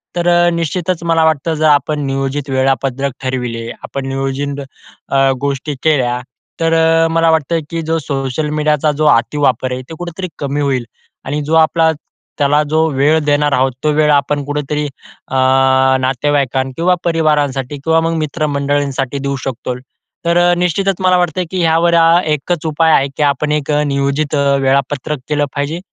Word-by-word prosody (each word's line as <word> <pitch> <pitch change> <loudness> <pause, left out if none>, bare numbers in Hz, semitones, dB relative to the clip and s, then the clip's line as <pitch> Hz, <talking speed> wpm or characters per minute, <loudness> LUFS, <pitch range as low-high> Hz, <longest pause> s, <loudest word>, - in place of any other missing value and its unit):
तर 175 0 -1
अ, 175 0 +4
निश्चितच 170 +1 -2
मला 165 -1 +2
वाटतं 160 +1 +1
जर 155 0 +2
आपण 145 +1 +2
नियोजित 135 +1 -2
वेळापत्रक 135 0 0
ठरविले. 120 -3 -3
आपण 135 -1 -5
नियोजित 135 +1 -3 0.5
अ, 135 0 +3
गोष्टी 140 +1 -2
केल्या, 125 -6 +2 0.4
तर 165 0 +2
अ, 165 0 +3
मला 165 0 +3
वाटतं 160 +1 +1
की 165 0 -2
जो 160 +1 0
सोशल 140 +1 -3
मीडियाचा 150 0 +1
जो 155 - +1
अतिवापर 130 0 0
आहे 130 - -4
ते 160 - -7
कुठेतरी 175 +1 -5
कमी 145 +1 -2
होईल. 135 -3 0 0.4
आणि 145 +3 -2
जो 155 +3 -3
आपला 160 0 +4 0.5
त्याला 145 +1 +3
जो 160 +1 +2
वेळ 145 +4 +3
देणार 145 0 +2
आहोत. 130 +1 +2
तो 155 - +2
वेळ 150 0 +3
आपण 145 0 +1
कुठेतरी 150 +1 -2 0.4
अ, - - -5 0.7
नातेवाईकां 135 0 0
किंवा 180 +2 +2
परिवारांसाठी 145 -5 0
किंवा 160 0 +3
मग 165 0 0
मित्रमंडळींसाठी 145 -3 -1
देऊ 140 0 -2
शकतो. 125 -1 -4 0.5
तर 170 +1 +2 0.2
निश्चितच 180 +3 0
मला 185 -1 +3
वाटतं 175 0 0
की 185 - -2
ह्यावर 165 +1 +3
अ, 165 +1 +5
एकच 155 +2 -1
उपाय 160 +1 +2
आहे 135 - +3
की 150 - +1
आपण 145 +1 0
एक 150 0 -1
अ, 150 0 +2
नियोजित 140 +2 -1
अ, 140 -1 +2
वेळापत्रक 140 +2 0
केलं 145 -1 +1
पाहिजे. 145 +4 -2
145 Hz, 160 wpm, -15 LUFS, 135-160 Hz, 0.7 s, अ